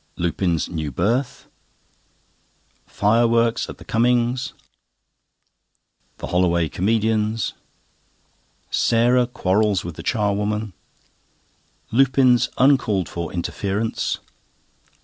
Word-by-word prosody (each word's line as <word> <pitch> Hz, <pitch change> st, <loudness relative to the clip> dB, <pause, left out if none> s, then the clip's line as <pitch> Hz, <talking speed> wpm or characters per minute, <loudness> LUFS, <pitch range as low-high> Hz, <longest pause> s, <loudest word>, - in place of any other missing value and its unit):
Lupin's 85 Hz, -1 st, -1 dB
new 80 Hz, -4 st, -4 dB
berth. 120 Hz, -, -1 dB, 1.4 s
Fireworks 115 Hz, +2 st, +2 dB
at -, -, -8 dB
the -, -, -14 dB
Cummings'. 120 Hz, +2 st, +1 dB, 1.6 s
The -, -, -6 dB
"Holloway 85 Hz, -2 st, +1 dB
Comedians." 110 Hz, +1 st, 0 dB, 1.2 s
Sarah 120 Hz, +2 st, +3 dB
quarrels 100 Hz, -4 st, 0 dB
with 85 Hz, -2 st, -7 dB
the -, -, -6 dB
charwoman. 105 Hz, -1 st, -1 dB, 1.2 s
Lupin's 130 Hz, 0 st, +3 dB
uncalled 120 Hz, -, +2 dB
for 85 Hz, -2 st, -5 dB
interference. 100 Hz, +5 st, -2 dB
110 Hz, 75 wpm, -22 LUFS, 90-120 Hz, 1.6 s, Sarah